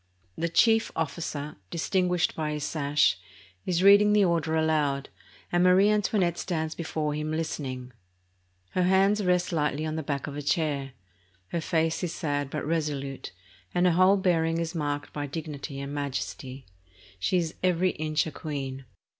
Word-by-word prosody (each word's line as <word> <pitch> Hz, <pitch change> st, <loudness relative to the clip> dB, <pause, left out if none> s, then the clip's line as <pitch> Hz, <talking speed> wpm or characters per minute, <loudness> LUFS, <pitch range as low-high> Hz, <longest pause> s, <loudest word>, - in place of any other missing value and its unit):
The 170 Hz, +8 st, -1 dB
chief 225 Hz, +6 st, +4 dB
officer, 150 Hz, -2 st, -3 dB
dis 165 Hz, -, -3 dB
tinguished 180 Hz, -3 st, +1 dB
by 155 Hz, -1 st, -2 dB
his 150 Hz, -1 st, -3 dB
sash, 145 Hz, -, +2 dB, 0.5 s
is 180 Hz, 0 st, +1 dB
reading 205 Hz, +1 st, +7 dB
the 210 Hz, -2 st, +5 dB
order 165 Hz, -2 st, +1 dB
aloud, 150 Hz, -3 st, +1 dB, 0.4 s
and 175 Hz, 0 st, +3 dB
Marie 185 Hz, +3 st, +5 dB
Antoinette 200 Hz, -4 st, +1 dB
.stands 160 Hz, -3 st, -2 dB
before 155 Hz, -2 st, -2 dB
him 150 Hz, +1 st, -3 dB
listening. 135 Hz, -6 st, -4 dB, 0.8 s
Her 185 Hz, -, 0 dB
hand 190 Hz, +3 st, +4 dB
rests 180 Hz, -2 st, +1 dB
lightly 150 Hz, -2 st, 0 dB
on 155 Hz, 0 st, -3 dB
the -, -, -1 dB
back 140 Hz, -2 st, -3 dB
of 145 Hz, -, -6 dB
a 145 Hz, -, -4 dB
chair. 145 Hz, -3 st, -1 dB, 0.6 s
Her 170 Hz, -, -2 dB
face 165 Hz, +1 st, 0 dB
is 175 Hz, -, -2 dB
sad 145 Hz, -3 st, -2 dB
but -, -, -4 dB
resolute, 145 Hz, -4 st, -2 dB, 0.4 s
and 175 Hz, 0 st, +3 dB
her 180 Hz, -, +5 dB
whole 185 Hz, +3 st, +5 dB
bearing 165 Hz, -3 st, +1 dB
is 165 Hz, -1 st, -2 dB
marked 145 Hz, -3 st, -3 dB
by 145 Hz, -1 st, -3 dB
dignity 145 Hz, -1 st, -6 dB
and 140 Hz, +1 st, -5 dB
majesty. 130 Hz, -2 st, -4 dB, 0.5 s
She 100 Hz, -, +1 dB
is 165 Hz, -2 st, -1 dB
every 180 Hz, 0 st, +2 dB
inch 155 Hz, 0 st, -1 dB
a 160 Hz, -, -5 dB
queen. 135 Hz, -4 st, -5 dB
160 Hz, 165 wpm, -27 LUFS, 145-180 Hz, 0.8 s, reading